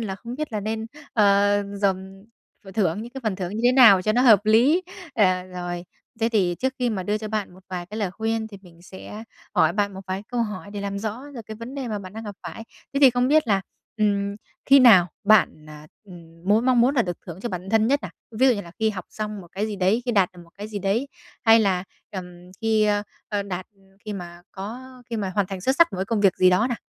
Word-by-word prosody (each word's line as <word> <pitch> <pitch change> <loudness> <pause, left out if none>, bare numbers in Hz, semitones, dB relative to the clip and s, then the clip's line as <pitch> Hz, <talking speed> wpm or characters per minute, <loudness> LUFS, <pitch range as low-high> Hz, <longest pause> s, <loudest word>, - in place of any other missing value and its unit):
là 200 -4 -3
không 235 +5 -8
biết 305 -2 -5
là 210 - -2
nên, 220 +2 -3 0.3
ờ, 205 -1 +4
dòm 195 -1 -2 0.4
phần 190 - -11
thưởng 200 -2 0
những 240 +2 -10
cái 270 - -7
phần 210 -4 -1
thưởng 185 -1 -4
như 220 - -2
thế 245 - +5
nào 230 -8 +7
cho 215 +3 +1
nó 245 - +3
hợp 220 -6 +7
lý, 250 +12 +4 0.3
à, 185 -3 +3
rồi. 175 -1 -6 0.4
Thế 225 - +2
thì 190 -6 +1
trước 260 0 0
khi 245 -2 +1
mà 195 -3 -2
đưa 210 +3 -1
cho 215 -1 -6
bạn 210 -4 -3
một 185 - -16
vài 180 -2 -5
cái 210 +4 -8
lời 200 -4 -1
khuyên, 225 +2 -2
thì 200 - -11
mình 170 -1 -18
sẽ 210 +4 -10 0.3
hỏi - - +4
bạn 200 -1 -1
một 190 - -7
vài 185 - -2
cái 200 - -11
câu 245 -1 0
hỏi 205 -2 -6
để 205 - -5
làm 200 0 -3
rõ 220 +4 -4
được 235 - -6
cái 220 - -7
vấn 230 +4 -8
đề 270 -3 -4
mà 210 -2 -2
bạn 190 -1 -10
đang 220 +1 -7
gặp 205 -2 -6
phải. 225 - -7 0.3
Thế 275 - +1
thì 270 -2 +8
không 245 +1 +1
biết 305 0 +4
là, 195 -2 +3 0.4
ừm, 200 -2 0 0.3
khi 275 0 +8
nào 215 -9 +7 0.2
bạn, 200 -7 +3
à, 150 0 -12 0.2
ừm, 165 -3 -14
muốn 215 +5 +3
mong 255 -2 +4
muốn 255 +4 +3
là 245 - +3
được 175 -4 -4
thưởng 175 +2 -8
cho 240 - -3
bản 185 0 -6
thân 220 -1 +3
nhất 280 +4 +2
nào? - - -6 0.3
Ví 260 - +5
dụ 245 - +4
như 205 - -3
là 170 -3 -11
khi 220 0 +2
học 185 -3 -6
xong 210 -1 -5
một 175 - -14
cái 205 +3 -2
gì 210 -2 -5
đấy, 195 +6 +2
khi 245 - -1
đạt 190 -3 +2
được 175 - -14
một 170 - -22
cái 210 +1 -6
gì 210 - -4
đấy, 200 +8 -1 0.4
hay 225 0 +7
là, 190 -3 +1 0.3
ừm, 180 -2 -9
khi, 220 -1 +2 0.4
ơ, 205 -1 -1
đạt 185 -2 -5 0.4
khi 210 - -5
mà 175 -2 -8
có 210 +6 -6 0.3
khi 230 - -2
mà 200 -3 -2
hoàn 205 -2 +1
thành 190 0 -6
xuất 265 +8 +1
sắc 335 -9 +5
một 185 - -5
cái 190 - 0
công 220 0 -1
việc 195 -3 +3
gì 185 0 +5
đó 185 +6 +3
nào? 245 -2 -2
205 Hz, 265 wpm, -24 LUFS, 185-225 Hz, 0.4 s, thì